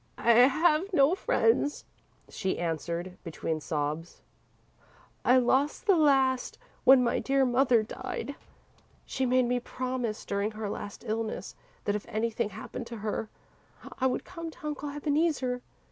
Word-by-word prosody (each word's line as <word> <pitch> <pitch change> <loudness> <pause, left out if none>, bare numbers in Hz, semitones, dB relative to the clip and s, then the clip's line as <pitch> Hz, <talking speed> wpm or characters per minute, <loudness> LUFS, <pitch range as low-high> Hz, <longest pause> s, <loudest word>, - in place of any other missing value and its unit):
"I 235 - +3
have 305 - +4
no 280 +1 +5
friends," 385 -5 +1 0.4
she 190 - -2
answered, 170 +2 -3
between 160 -2 -3
sobs. 155 +1 -3 1.0
"I 250 - +5
lost 265 - +2
the 395 -4 +5
last 270 -5 +2 0.3
when 260 -1 +8
my 235 - +1
dear 270 0 +2
mother 245 -2 +3
died. 230 +4 -5 0.7
She 265 -1 -1
made 255 0 +3
me 245 +1 +1
promise, 250 -3 -4
during 200 +1 -1
her 215 -1 -4
last 205 - -7
illness, 220 0 -3 0.3
that 205 - +1
if 210 - -4
anything 225 0 -1
happened 220 +3 -7
to 235 - -7
her, 215 0 -2 0.7
I 260 - +3
would 250 - -2
come 335 -2 -7
to 320 0 -13
Uncle 295 -1 -3
Ebeneezer. 290 -3 0
250 Hz, 140 wpm, -29 LUFS, 215-280 Hz, 1.0 s, when